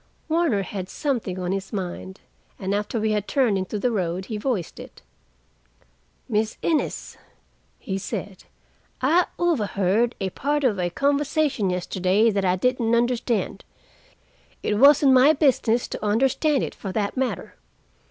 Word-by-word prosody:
Warner 315 - +1
had 190 -1 -6
something 235 -10 -2
on 180 -1 -2
his 195 0 -3
mind, 190 -1 -5 0.4
and 195 0 -3
after 210 +3 -1
we 215 0 0
had 210 -1 -1
turned 255 -7 +2
into 190 +2 -2
the 245 +4 0
road, 185 -3 -2
he 215 - -4
voiced 210 - -3
it. - - -12 1.2
"Miss 220 -2 -1
Innes," 320 -3 -1 0.6
he 195 0 -4
said. 195 0 -6 0.5
"I 330 +7 +3
overheard 230 - +1
a 190 -2 -2
part 290 +6 -1
of 220 -7 +1
a 175 -1 0
conversation 280 - 0
yesterday 185 +4 +1
that 200 -1 -1
I 180 -1 +2
didn't 235 +2 +1
understand. 240 -1 0 1.0
It 210 - 0
wasn't 280 0 +7
my 260 +4 +6
business 255 -5 +2
to - - -6
understand 265 +6 +2
it, - - -4
for 195 - -6
that 205 -1 -1
matter. 260 -1 -2
220 Hz, 145 wpm, -24 LUFS, 195-265 Hz, 1.2 s, wasn't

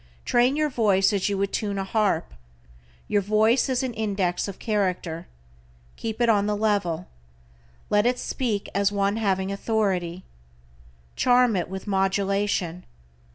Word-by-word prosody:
Train 245 +3 +3
your 305 -1 0
voice 205 -4 +3
as 200 0 0
you 200 - -1
would 200 0 -1
tune 205 -3 -2
a 195 - -1
harp. 195 -4 0 0.7
Your 205 - +2
voice 215 +6 +2
is 260 0 0
an 255 -2 -2
index 195 -5 -1
of 200 - -7
character. 180 -6 -2 0.7
Keep 220 0 -5
it 240 - +4
on 205 -3 +3
the 210 0 0
level. 200 -5 0 0.8
Let 210 +2 +4
it 250 0 +1
"speak 225 -7 -2
as 200 0 +2
one 200 +1 0
having 195 -3 0
authority." 190 -4 -1 0.9
Charm 245 -3 +4
it 175 -2 -1
with 190 0 -6
modulation. 195 -2 0
200 Hz, 145 wpm, -25 LUFS, 190-220 Hz, 0.9 s, it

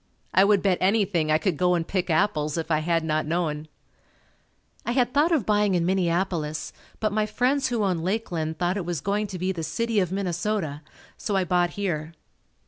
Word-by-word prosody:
I 190 - +6
would 200 -1 +3
bet 190 -3 +2
anything 185 -5 +2
I 155 - +5
could 160 0 -1
go 180 +1 +3
and 165 -1 -2
pick 185 -2 -1
apples 155 -3 +1
if 165 0 -3
I 155 - +3
had 165 +1 0
not 155 -1 0
known. 155 -2 -1 1.2
I 240 - -1
had 250 -1 +1
thought 300 +4 +3
of 300 - +2
buying 210 -2 +2
in 170 -1 +1
Minneapolis, 170 -4 -1 0.3
but 215 -1 0
my 215 0 +1
friends 260 +5 +1
who 235 -4 0
owned 180 -5 0
Lakeland 175 -5 -2
thought 180 +2 0
it 195 - -2
was 175 -3 -2
going 205 +6 -1
to 190 -2 -6
be 185 +2 -1
the 175 -3 -4
city 225 +8 0
of 180 -3 0
Minnesota, 180 -4 -2 0.4
so 205 - -2
I 190 - +3
bought 175 0 +1
here. 165 -5 -2
180 Hz, 200 wpm, -25 LUFS, 165-205 Hz, 1.2 s, I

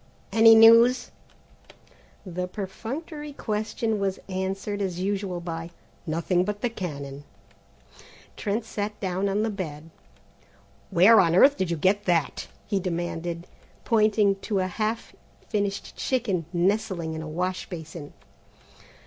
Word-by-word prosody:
"Any 225 0 +8
news?" 230 +3 +7 1.1
The 180 0 -4
perfunctory 270 - -6
question 215 -2 -2
was 195 -1 -1
answered 195 +2 -3
as 180 -3 -2
usual 195 -1 -2
by: 165 -1 -5 0.4
"Nothing 170 +3 +1
but 205 +1 -4
the 245 - 0
cannon." 145 -8 -6 1.1
Trent 215 +2 -2
sat 210 -1 -4
down 190 +1 -1
on 205 +2 0
the 220 - 0
bed. 165 -5 -6 1.0
"Where 205 +6 +7
on 170 -2 +4
earth 275 +9 +7
did 185 -7 -2
you 170 - -1
get 200 +6 +2
that?" 165 -6 0 0.2
he 200 -2 0
demanded, 175 -1 -3 0.4
pointing 210 -3 +3
to 200 +1 -3
a 185 - +1
half 215 +5 -3 0.3
finished 200 -2 -2
chicken 205 - -1
nestling 185 -2 0
in 160 - -5
a 160 - -6
wash 180 +3 -3
basin. 160 -3 -8
195 Hz, 125 wpm, -26 LUFS, 175-215 Hz, 1.1 s, Any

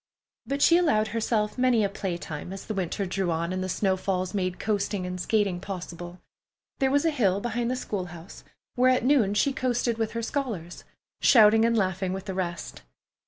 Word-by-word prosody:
But 280 +1 0
she 340 - +6
allowed 220 -11 +2
herself 220 0 -1
many 250 -4 +3
a - - +3
playtime 175 -5 -5
as 195 - -7
the 215 - -4
winter 195 0 -2
drew 185 0 -1
on 170 +2 -1
and 185 0 -2
the 185 - -3
snow 190 +1 +1
falls 185 0 -2
made 185 -2 -1
coasting 200 -2 -1
and 180 0 -4
skating 200 -3 +1
possible. 175 -2 -7 0.6
There 270 -1 +3
was 285 +3 +2
a 325 - +3
hill 200 -9 +1
behind 240 +2 -2
the 255 - 0
school 205 -7 -3
house 170 +1 -11 0.3
where 255 0 +4
at 255 -1 +2
noon 245 -8 +3
she 275 +6 +2
coasted 245 -3 -1
with 225 -1 -1
her 230 0 -3
scholars, 220 - -4 0.4
shouting 220 -1 +6
and 230 0 +2
laughing 190 -2 0
with 190 +1 -5
the 195 - -4
rest. 175 -2 -4
200 Hz, 195 wpm, -26 LUFS, 185-235 Hz, 0.6 s, she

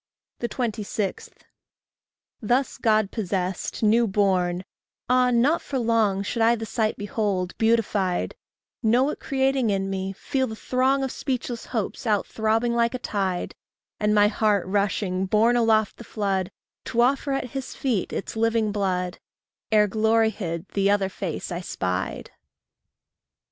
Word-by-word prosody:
26. 215 -4 -3 1.1
Thus 245 +5 0
God 215 -3 +2
possessed, 190 -2 -3
new 225 +2 +4
born, 185 -3 +1 0.4
ah, 250 0 +4
not 260 +8 +3
for 280 - -4
long 225 -5 +2
Should 230 +3 -2
I 230 +1 +5
the 225 -1 -5
sight 220 0 -1
behold, 200 -3 -2
beatified, 215 -5 +1 0.5
Know 250 +5 +3
it - - -7
creating 265 -3 +1
in 195 -1 0
me, 190 0 -3
feel 260 +6 -1
the 220 - -6
throng 260 +4 +1
Of 265 - -2
speechless 250 -3 -3
hopes 230 0 -3
out 210 -2 +2
throbbing 225 +2 0
like 235 +1 +1
a - - 0
tide, 195 -7 -2 0.5
And 210 0 +2
my 205 0 +6
heart 210 -2 +1
rushing, 190 -1 0
borne 220 +5 +3
aloft 220 -2 +2
the - - -9
flood, 195 -5 -1 0.4
To 235 - +1
offer 275 +3 +2
at 255 -3 -3
his 270 -1 -5
feet 240 -8 -1
its - - -4
living 225 -1 +1
blood 185 -3 -1 0.5
Ere, 210 -1 +5
glory 220 +2 +2
hid, 170 -5 -5
the 195 0 +1
other 200 -1 +2
face 185 -4 -5
I 175 0 -3
spied. 90 - -3
215 Hz, 145 wpm, -25 LUFS, 195-235 Hz, 1.1 s, my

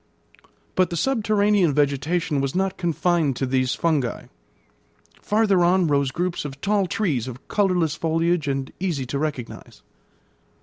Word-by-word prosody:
But 185 -2 +2
the 170 - -3
subterranean 205 - +2
vegetation 145 +1 0
was 135 +2 -2
not 190 0 0
confined 170 -4 0
to 135 - -1
these 130 0 0
fungi. 150 -8 0 1.0
Farther 210 -4 +2
on 180 +1 +3
rose 140 -3 +1
groups 175 +6 -2
of 140 -2 -7
tall 200 +1 +1
trees 155 - -1
of 130 +1 -9
colourless 180 -6 +1
foliage 165 0 0
and 135 -1 -2
easy 170 -8 -2
to 140 +3 -3
recognise. 145 -6 -5
165 Hz, 135 wpm, -23 LUFS, 140-185 Hz, 1.0 s, on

